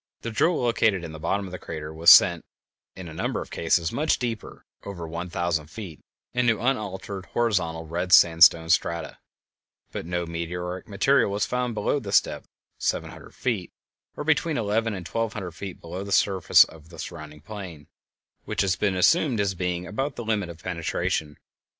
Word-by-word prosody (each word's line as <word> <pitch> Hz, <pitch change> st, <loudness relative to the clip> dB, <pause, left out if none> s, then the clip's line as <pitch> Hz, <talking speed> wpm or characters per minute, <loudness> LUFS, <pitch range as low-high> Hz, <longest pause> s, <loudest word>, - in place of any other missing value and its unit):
The 115 Hz, -, -3 dB
drill 165 Hz, +10 st, +2 dB
located 110 Hz, -6 st, +2 dB
in 85 Hz, -, -6 dB
the 80 Hz, -, -9 dB
bottom 100 Hz, +5 st, -1 dB
of 95 Hz, -, -9 dB
the 90 Hz, -, -6 dB
crater 75 Hz, 0 st, -7 dB
was 80 Hz, +2 st, +5 dB
sent, -, -, +8 dB, 0.5 s
in 95 Hz, -2 st, -8 dB
a 80 Hz, -, -9 dB
number 80 Hz, -, -2 dB
of -, -, -8 dB
cases, 85 Hz, 0 st, +1 dB
much 155 Hz, +2 st, +1 dB
deeper 115 Hz, -3 st, -5 dB, 0.2 s
(over 85 Hz, -5 st, -7 dB
one 85 Hz, +2 st, -5 dB
thousand 85 Hz, -3 st, -1 dB
feet) 90 Hz, -3 st, -9 dB, 0.3 s
into 120 Hz, -3 st, +2 dB
unaltered 100 Hz, -6 st, -3 dB
horizontal 90 Hz, -9 st, 0 dB
red 90 Hz, +3 st, -3 dB
sandstone 80 Hz, -1 st, +6 dB
strata, 85 Hz, 0 st, 0 dB, 0.7 s
but -, -, -6 dB
no 90 Hz, 0 st, -2 dB
meteoric 90 Hz, +2 st, -5 dB
material 120 Hz, +5 st, +2 dB
was 100 Hz, +1 st, 0 dB
found 125 Hz, -2 st, -2 dB
below 110 Hz, +7 st, 0 dB
this 100 Hz, -5 st, +4 dB
depth -, -, -8 dB, 0.3 s
(seven -, -, -1 dB
hundred -, -, -13 dB
feet, 105 Hz, -9 st, -2 dB, 0.5 s
or -, -, -3 dB
between 160 Hz, 0 st, +1 dB
eleven 110 Hz, 0 st, 0 dB
and 90 Hz, -3 st, -7 dB
twelve 115 Hz, +4 st, -2 dB
hundred 95 Hz, -5 st, -5 dB
feet 95 Hz, +2 st, -8 dB
below 90 Hz, +3 st, -6 dB
the 100 Hz, 0 st, +3 dB
level 95 Hz, -2 st, -6 dB, 0.2 s
of 80 Hz, 0 st, -17 dB
the 85 Hz, -, -13 dB
surrounding 75 Hz, -2 st, -8 dB
plain), 90 Hz, -5 st, -9 dB, 0.6 s
which -, -, -1 dB
has 95 Hz, -2 st, +1 dB
been 100 Hz, +1 st, 0 dB
assumed 130 Hz, -, +3 dB
as 100 Hz, -2 st, +1 dB
being 90 Hz, -1 st, -2 dB
about 135 Hz, -, -3 dB
the 120 Hz, -, -6 dB
limit 105 Hz, -5 st, -1 dB
of 85 Hz, 0 st, -11 dB
penetration. 80 Hz, -4 st, -2 dB
95 Hz, 180 wpm, -25 LUFS, 85-110 Hz, 0.7 s, sent